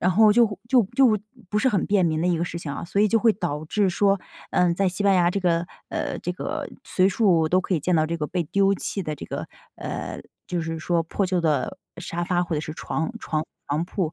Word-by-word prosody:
然 180 - +3
后 210 +3 +6
就 225 -2 +3
就 255 -2 +5
就 240 -6 +5 0.3
不 210 - 0
是 260 - +3
很 205 -7 +1
便 200 -2 +3
民 160 -1 +1
的 175 - +1
一 175 -2 +2
个 170 - 0
事 175 0 -5
情 155 -4 -6
啊。 140 - -5
所 200 +4 0
以 210 - +5
就 225 - +3
会 225 0 +4
导 160 -6 -3
致 200 +4 +1
说， 195 +1 +2 0.3
呃， 175 -1 +3
在 195 +1 +1
西 185 +3 -3
班 200 -1 +4
牙 175 -1 +4
这 200 - -1
个， 170 -1 +1 0.2
呃， - - -3
这 180 - -3
个 290 - -4
随 185 -6 +2
处 175 -6 +3
都 185 +2 +3
可 185 - -1
以 155 - 0
见 180 +2 +1
到 155 - +3
这 165 +2 -2
个 150 -2 -2
被 180 +1 -1
丢 195 +5 +2
弃 195 +1 -3
的 155 -2 -3
这 - - -8
个， - - -5 0.3
呃， - - -5 0.3
就 175 -1 -2
是 165 0 -3
说 170 +1 +1
破 195 +4 -1
旧 180 -1 0
的 155 -3 0 0.2
沙 170 +1 -4
发 175 -1 +1
或 170 -2 -2
者 150 - 0
是 155 0 -6
床 160 0 -3
床 155 0 -2 0.2
床 150 +4 0
铺。 175 -5 -2
180 Hz, 270 characters per minute, -24 LUFS, 165-200 Hz, 0.3 s, 后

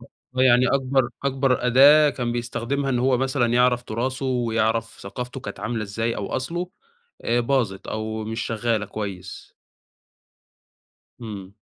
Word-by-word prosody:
آه، - - -15 0.3
يعني 125 0 +5
أكبر 135 -2 +1 0.2
أكبر 135 -2 +1
أداة 145 +4 +7
كان 120 -3 -3
بيستخدمها 120 +3 -2
إن 125 - +1
هو 130 0 +2
مثلًا 130 -1 +1
يعرف 125 0 +3
تُراثه 130 +4 -3
ويعرف 115 -2 0
ثقافته 125 +6 -6
كانت 135 - -8
عاملة 115 -1 -2
إزاي 115 +3 -2
أو 100 - -3
أصله، 175 +7 -4 0.5
آآ 120 +1 +2
باظت 120 -6 -1
أو 110 0 -4
مش 115 +2 -4
شغّالة 115 -1 -1
كويس. 95 -4 -7 1.7
إمم. 100 -4 -8
120 Hz, 135 wpm, -23 LUFS, 110-130 Hz, 1.7 s, أداة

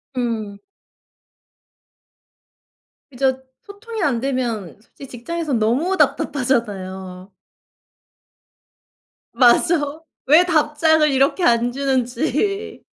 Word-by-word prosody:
음. 225 -5 -3 2.5
그죠. 265 0 -1 0.2
소통이 440 0 -8
안되면 240 - -2
솔직히 270 +4 -14
직장에선 285 +3 -3
너무 270 +13 0
답답하잖아요. 190 - -2 2.0
맞아. 290 +4 +2 0.3
왜 310 +6 +6
답장을 315 -2 +2
이렇게 275 +7 +1
안 240 -3 +2
주는지. 275 - -2
265 Hz, 170 characters per minute, -20 LUFS, 235-315 Hz, 2.5 s, 왜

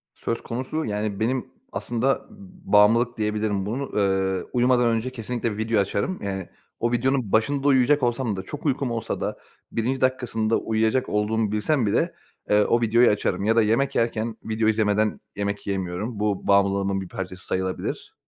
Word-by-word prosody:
Söz 115 - -3
konusu, 130 +7 -3
yani, 105 -1 -2
benim 125 +3 -1 0.2
aslında, 120 +3 0
ımm, - - -15 0.5
bağımlılık 115 +4 +5
diyebilirim. 105 -2 -1
Bunu, 125 +7 -2
ııı, 95 -2 +1
uyumadan 125 0 +3
önce 115 +2 0
kesinlikle 115 -2 -3
video 110 -1 +1
açarım. 100 - -2
Yani, 95 -2 -4 0.3
o 120 - 0
videonun 125 -2 +1
başında 140 +6 +2
uyuyacak 135 +1 +4
olsam 120 -2 0
da, 95 - -5
çok 150 +9 -8
uykum 135 -2 0
olsa 115 -2 -3
da - - -2 0.3
1'nci 125 +4 -1
dakikasında 120 -4 +1
uyuyacak 110 +3 0
olduğumu 105 0 0
bilsem 120 +5 +1
bile, 100 - +1 0.4
eee, 105 0 +5
o 120 +3 +2
videoyu 115 +2 +5
açarım 105 -1 0
ya 110 +1 +3
da 115 - +5
yemek 115 +6 +1
yerken 115 -1 0
video 110 0 0
izlemeden 110 -1 +2 0.2
yemek 100 0 -3
yiyemiyorum. 95 +3 -3
Bu 105 -2 -1
bağımlılığımın 100 -1 +2
bir 95 - -7
parçası 90 -1 -6
sayılabilir. 95 0 -3
110 Hz, 160 wpm, -24 LUFS, 105-120 Hz, 0.5 s, bağımlılık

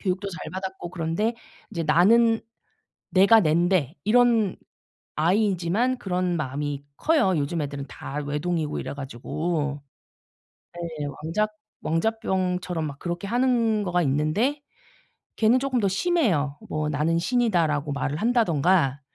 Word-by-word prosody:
교육도 195 +1 -2
잘 165 -3 -7
받았고 190 -2 -5
그런데 180 +6 -1 0.4
이제 170 -5 -3
나는 225 +9 +4 0.7
내가 200 +4 +6
낸데 170 -2 +2
이런 230 -3 +3 0.6
아이이지만 195 +7 +1
그런 180 -4 -1
마음이 145 0 -3
커요. 300 - +2
요즘 150 +3 -1
애들은 140 -1 -4
다 135 - -8
외동이고 150 +1 -2
이래 - - -5
가지고. 145 +3 -3 0.9
네. 175 - -8 0.4
왕자 200 +7 +1 0.4
왕자병처럼 180 -2 -1
막 140 -1 -7
그렇게 175 +2 -4
하는 230 -3 +2
거가 180 -1 +1
있는데 155 - 0 0.8
걔는 230 +3 +4
조금 265 -2 0
더 200 - +2
심해요. 190 - +1
뭐 155 0 -1
"나는 155 +3 +1
신이다."라고 170 - +1
말을 145 +1 -2
한다든가 175 - +2
180 Hz, 275 characters per minute, -25 LUFS, 150-220 Hz, 0.9 s, 내가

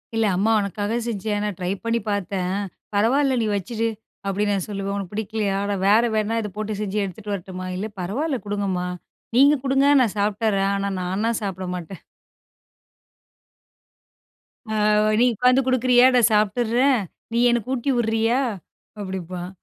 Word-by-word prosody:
"இல்ல. 225 0 +2
அம்மா 215 +4 +2
உனக்காக 205 +3 -2
செஞ்சேன். 210 -1 -2
நான் 205 -4 -3
ட்ரை 180 +1 -2
பண்ணி 230 0 +1
பார்த்தேன். 195 -1 -1 0.4
பரவால்ல, 260 +5 +3
நீ 220 - 0
வச்சுடு." 225 +4 -2 0.4
அப்டின்னு 205 +1 0
நான் 190 - -3
சொல்லுவேன். 200 -1 -3
"உனக்கு 195 -1 -5
பிடிக்கலையா? 210 -2 -1
நான் 190 -1 -2
வேற 220 +3 +5
வேணா, 215 +1 0
இத 210 - -4
போட்டு 215 -1 -3
செஞ்சு 210 0 -3
எடுத்துட்டு 200 +2 -6
வரட்டுமா?" 185 -1 -6
`இல்ல, 205 +4 -3
பரவால்ல 260 - -2
குடுங்கம்மா. 195 -3 -2 0.5
நீங்க 280 +2 +7
குடுங்க. 270 +1 +3
நான் 225 -5 0
சாப்ட்டர்றேன். 200 -1 +1
ஆனா, 200 0 -1
நானா 190 +5 -1
சாப்ட 190 -2 -4
மாட்டேன்.' 180 +1 -8 2.7
ஆ. - - -1 0.4
`நீ 245 - +5
உட்காந்து 250 +4 +4
குடுக்குறியா? 255 -1 +4
நான் 240 -2 +5
சாப்ட்டுர்றேன். 235 +5 +2 0.3
நீ 235 - +2
எனக்கு 240 +1 -1
ஊட்டி 265 +2 0
விட்றியா?' 225 +2 +1 0.6
அப்படிம்பான். 185 -2 -5
210 Hz, 140 wpm, -23 LUFS, 195-235 Hz, 2.7 s, நீங்க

